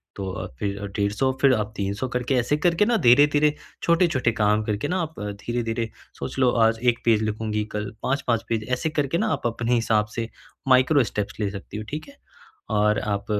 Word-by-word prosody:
तो 95 -1 -4
अ, - - -5
फिर 100 0 -3
150 105 +6 +1
फिर 135 -2 +6
आप 105 -1 -3
300 100 +4 -2
करके 125 +2 -1
ऐसे 125 +4 +1
करके 175 +5 +2
ना 235 +1 +2
धीरे-धीरे 145 +4 +5 0.3
छोटे-छोटे 170 -8 +3
काम 105 -1 +2
करके 105 -1 -2
ना 185 - 0
आप 160 -1 -6 0.2
धीरे-धीरे 115 -1 -2 0.3
सोच - - -5
लो 130 -2 +5 0.2
आज 115 0 +2
एक 120 -1 +3
पेज 115 -2 +4
लिखूँगी 110 0 -2
कल 105 -1 -3
5-5 125 -4 0
पेज 110 -2 -1
ऐसे 145 +5 0
करके 150 0 0
ना 220 - +1
आप - - -1
अपने 120 +1 -1
हिसाब 110 -2 +2
से 115 -1 -3 0.4
माइक्रो 130 +2 +5
स्टेप्स 105 -2 -4
ले 105 -2 0
सकती 100 +1 -8
हो, 110 - -4
ठीक 150 +1 -5
है? 280 - -16 0.5
और 105 0 +2
आप 100 -1 -2
115 Hz, 195 wpm, -24 LUFS, 105-135 Hz, 0.5 s, फिर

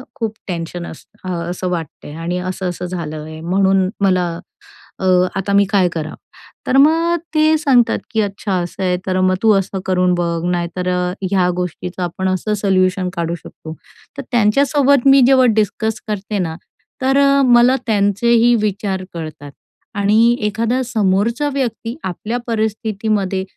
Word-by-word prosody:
खूप 225 -5 -3
टेन्शन 170 0 -5
असतं 185 +3 -11
अ, 170 -1 -3
असं 180 +1 -3
वाटते 165 -4 -5
आणि 165 +3 -3
असं-असं 180 -1 -4
झालं 170 -4 -5
आहे, 155 0 -9
म्हणून 190 +2 +2
मला 185 -2 +2 0.7
अ, - - -3 0.3
आता 195 +1 -2
मी 200 0 +5
काय 195 -3 +3
करावं. 155 -1 -5 0.5
तर 265 - +2
मग 325 +4 +4 0.2
ते 310 +1 +4
सांगतात, 265 -6 +3
"की 220 -1 +1
अच्छा 200 0 -3
असं 185 +2 -6
आहे 180 -1 +1
तर 185 -1 0
मग 185 0 +3
तू 220 - +5
असं 195 0 -4
करून 180 -1 +2
बघ, 170 -1 -2
नाही 175 -1 -1
तर 180 0 -3 0.4
ह्या 185 -2 +2
गोष्टीचं 180 +1 -4
आपण 180 +2 -3
असं 185 +3 -1
सल्यूशन 185 -2 +1
काढू 170 -1 -2
शकतो." 160 -1 -11 0.4
तर 275 - -3
त्यांच्यासोबत 270 +4 +3
मी 275 0 +7
जेव्हा 260 -1 +5
डिस्कस 220 +1 0
करते 210 0 -3
ना 165 -3 -2 0.5
तर 270 +1 +2 0.3
मला 245 +1 +5
त्यांचेही 225 +3 +3
विचार 200 -2 -2
कळतात 155 -4 -8 0.4
आणि 215 +4 +3
एखादा 230 +4 -1
समोरचा 230 +4 0
व्यक्ती 235 -3 -3
आपल्या 210 +6 -3
परिस्थितीमध्ये 215 -3 -1
195 Hz, 150 wpm, -18 LUFS, 180-230 Hz, 0.7 s, मी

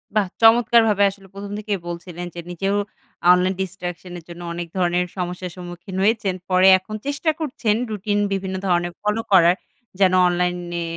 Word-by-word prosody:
বাহ 210 -3 +2
চমৎকারভাবে 225 -2 +5
আসলে 195 0 -16
প্রথম 200 0 -8
থেকেই 210 -2 -3
বলছিলেন 175 0 -6
যে, - - -6
নিজেও 195 +3 -1 0.6
online 180 +1 +3
distraction 180 -1 -6
এর - - -17
জন্য 170 0 -9
অনেক 170 0 -5
ধরনের 180 0 +1
সমস্যার 180 0 -4
সম্মুখীন 175 +1 -9
হয়েছেন। 210 -3 +1
পরে 185 +1 +5
এখন 215 +3 -8
চেষ্টা 290 +3 0
করছেন 250 -8 -1 0.2
রুটিন 205 0 -1
বিভিন্ন 190 -1 -3
ধরনের 175 -1 +1
ফলো 210 +2 0
করার 175 -2 +6 0.4
যেন 185 -2 +4
অনলাইনে 175 -1 -1
185 Hz, 155 wpm, -21 LUFS, 175-205 Hz, 0.6 s, করার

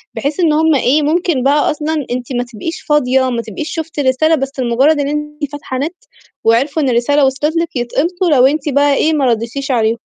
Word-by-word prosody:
بحيث 285 +3 -3
إن 330 -4 +3
هُم 315 0 +3
إيه، 275 +3 +2
ممكن 315 -3 0
بقى 285 +2 +2
أصلًا 300 -1 -3
أنتِ 250 +1 -4
ما 245 - 0
تبقيش 325 +10 -5
فاضية 265 -3 +1
ما 235 -2 -2
تبقيش 235 +7 -6
شُفتي 320 -2 -4
الرسالة 285 +5 +2
بس 270 -2 -5
لمجرّد 260 +5 +2
إن 280 - 0
أنتِ 300 -1 -4
فاتحة 290 -3 -6
نت، 310 +7 -3 0.5
وعرفوا 270 +7 +2
إن 270 - +1
الرسالة 260 +4 +2
وصلِت 285 +4 -1
لِك 335 -1 -2
يتقمصوا 335 +9 -1
لو 260 -3 +5
أنتِ 295 +2 +1
بقى 285 +1 +3
إيه 315 +3 +2
ما 290 -3 +1
رديتيش 245 +4 -1
عليهم. 225 -2 +1
285 Hz, 205 wpm, -15 LUFS, 255-310 Hz, 0.5 s, لو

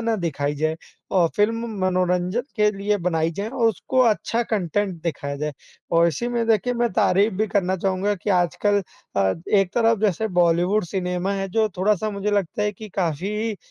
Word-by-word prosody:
ना 230 0 0
दिखाई 145 -5 -2
जाए 155 +2 0 0.4
अ, 180 -3 +4
फ़िल्म 225 +3 +1 0.2
मनोरंजन 180 +3 +1
के 210 0 +4
लिए 205 +1 0
बनाई 165 -3 0
जाए 200 +6 -4
और 235 -1 +1
उसको 225 +4 0
अच्छा 230 +2 -1
कंटेन्ट 205 -3 -1
दिखाया 140 -4 -3
जाए। 150 +1 -3 0.4
और 170 0 +5
इसी 170 - -2
में 235 -1 -1
देखिए 225 +2 +2
मैं 240 0 +1
तारीफ़ 195 +4 +3
भी 215 +3 0
करना 190 -2 +1
चाहूँगा 190 +2 0
कि 200 +2 -4
आजकल 195 +3 +2 0.3
अ, 95 -1 +2
एक 195 -3 +2
तरफ 230 -1 +3
जैसे 215 0 +1
बॉलीवुड 175 +4 +2
सिनेमा 180 +1 -2
है 195 0 -3
जो 220 +3 +1
थोड़ा-सा 210 +2 +1
मुझे 200 0 -2
लगता 205 0 0
है 210 - 0
कि 215 +2 -10
काफ़ी 200 +6 -1
195 Hz, 180 wpm, -23 LUFS, 175-215 Hz, 0.4 s, और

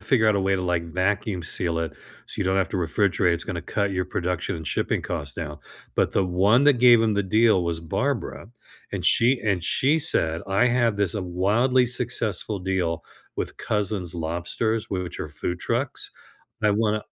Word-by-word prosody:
figure 115 -5 +3
out 105 - +3
a - - +1
way 95 0 +1
to, 95 - -1
like, 85 -2 -2
vacuum 95 0 0
seal 85 0 0
it 80 -2 -3 0.3
so - - -3
you 100 - 0
don't 95 +1 +1
have 95 -3 +1
to - - -3
refrigerate. 90 +1 +1
It's 85 - -4
gonna 85 -3 -4
cut 100 +1 -1
your 90 -1 -1
production 90 -1 -2
and 80 -1 -7
shipping - - -1
cost 70 0 -5
down," 75 -3 -6 0.4
but - - +2
the 95 - +2
one 100 +8 +3
that 145 -4 +5
gave 120 -1 +7
him 110 -2 +2
the 100 - +1
deal 110 -2 +3
was 85 -1 -2
Barbara, 80 +3 -2 0.5
and - - -4
she 125 +2 +3
and 95 -5 0
she 145 - +2
said, 80 - +1
"I 100 +6 +3
have 120 -3 +2
this 100 -4 0
wildly 105 +8 +2
successful 110 -5 0
deal 90 -3 -1 0.3
with - - -4
Cousins 100 -4 -2
Lobsters, 85 +7 -2
w 95 -2 -3
which 90 - -7
are - - -4
food 85 +3 -4
trucks. - - -3 0.5
I 105 - +4
wanna" 105 0 +1
95 Hz, 190 wpm, -24 LUFS, 85-110 Hz, 0.5 s, gave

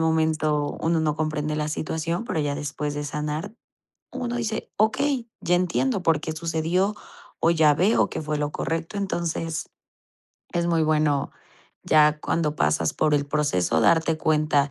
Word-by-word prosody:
momento 155 -2 +1
uno 165 0 +1
no 155 -2 +1
comprende 155 -1 -2
la 150 0 -1
situación, 160 +5 -2
pero 165 -8 -1
ya 145 -1 -1
después 145 0 -4
de 145 0 -3
sanar 150 +6 -3 0.6
uno 245 -1 -3
dice: 225 -2 -3
"Okey, 240 +3 +1
ya 180 - +1
entiendo 185 +5 +1
por 165 -3 +2
qué 160 - -4
sucedió 165 +5 0 0.5
o 165 - +4
ya 155 -3 +4
veo 190 +8 +3
que - - -4
fue 150 -1 -2
lo 145 0 -2
correcto". 165 +5 -3
Entonces, 170 -4 -2 0.8
es 170 0 0
muy 165 -2 +2
bueno, 150 -2 +1 0.5
ya 150 -1 +4
cuando 155 -2 0
pasas 75 +1 +1
por 150 - +1
el 145 -1 +1
proceso, 140 - +1
darte 165 - +3
cuenta, 150 -2 +2
155 Hz, 155 wpm, -24 LUFS, 150-170 Hz, 0.8 s, o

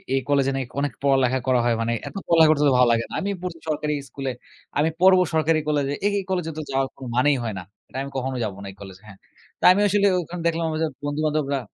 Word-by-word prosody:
এই 135 - +1
কলেজে 140 -1 +2
নাকি 135 -2 -3
অনেক 145 -1 -1
পড়ালেখা 130 -2 +3
করা 125 -2 +3
হয়। 120 -1 +2
মানে 115 +1 0
এত - - -9
পড়ালেখা 165 -2 +6
করতে 150 -1 +2
তো - - +3
ভালো 125 - +5
লাগে 115 0 +2
না। - - -10
আমি 200 - -2
পড়ছি 175 -2 -5
সরকারি 150 0 -1 0.2
স্কুলে, 135 -2 -4 0.5
আমি 155 +2 +3
পড়ব 185 0 +7
সরকারি 160 0 +2
কলেজে। 145 -2 0
এ - - +5
এই - - -4
কলেজে 180 -4 -1
তো - - -3
যাওয়ার 135 0 +1
কোন 135 - -9
মানেই 140 +2 +3
হয় 110 -3 -3
না। - - -8 0.2
"এটা - - -9
আমি 140 - -6
কখনো 130 0 -2
যাব 105 - -2
না - - -7
এই - - -17
কলেজে।" 95 -1 -11
হ্যা? 100 - -12 0.4
তো - - -14
আমি 200 +3 +3
আসলে 200 0 +3
ওখানে 175 +1 -7
দেখলাম 165 0 0
আমার 155 0 -3
য - - +3 0.2
বন্ধুবান্ধবরা 145 -1 -1
145 Hz, 245 wpm, -23 LUFS, 130-160 Hz, 0.5 s, পড়ব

